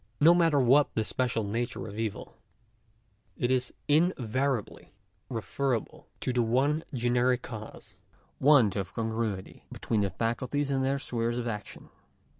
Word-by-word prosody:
No 165 +4 +7
matter 165 -4 +3
what 135 +3 +4
the 110 - +1
special 115 -1 0
nature 115 +4 -3
of 100 - -8
the 110 - -4
evil, 110 -3 -5 1.0
it 120 - 0
is 125 -1 +1 0.2
invariably 135 - 0 0.4
referable 125 0 -3
to 130 - -1
the 125 - +2
one 135 +7 +1
generic 125 -1 +1
cause 110 -2 -9 0.2
— - - -36
want 120 -10 +6
of 95 -3 -4
congruity 110 -4 -3
between 110 -2 -1
the 100 - +1
faculties 125 +8 -2
and 135 -1 +1
their 135 +1 +1
spheres 120 -3 -2
of 120 -1 -3
action. 105 -3 -6
120 Hz, 145 wpm, -29 LUFS, 115-135 Hz, 1.0 s, No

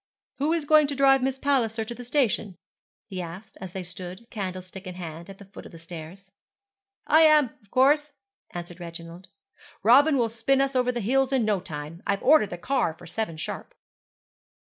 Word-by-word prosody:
'Who 295 +3 +1
is 330 -3 0
going 305 0 +5
to 285 - -3
drive 270 -1 +5
Miss 265 0 -1
Palliser 240 -6 0
to 235 - -6
the 245 - -9
station?' 235 -7 0 0.5
he 185 -2 -5
asked, 175 +5 -9
as 185 -2 -7
they 190 - -4
stood, 185 +4 -9
candlestick 185 -1 -6
in 180 - -7
hand, 170 0 -8
at 195 - -10
the 200 - -13
foot 195 - -12
of - - -16
the 165 - -11
stairs. 170 +3 -10 0.7
'I 315 +2 +5
am, 305 -2 +6 0.2
of 205 - -28
course,' 290 +5 +3 0.4
answered 175 0 -8
Reginald. 170 +1 -9 0.6
'Robin 275 +7 +6
will 235 -2 +2
spin 230 +4 +1
us 275 0 +1
over 250 -1 +2
the 240 -1 -3
hills 265 +5 +2
in 260 -4 +2
no 210 -3 +1
time. 155 0 -8
I've 200 0 0
ordered 260 -6 +5
the 175 - -6
car 175 -5 0
for 175 - -14
seven 175 -1 -4
sharp.' - - -6
210 Hz, 190 wpm, -26 LUFS, 180-270 Hz, 0.7 s, am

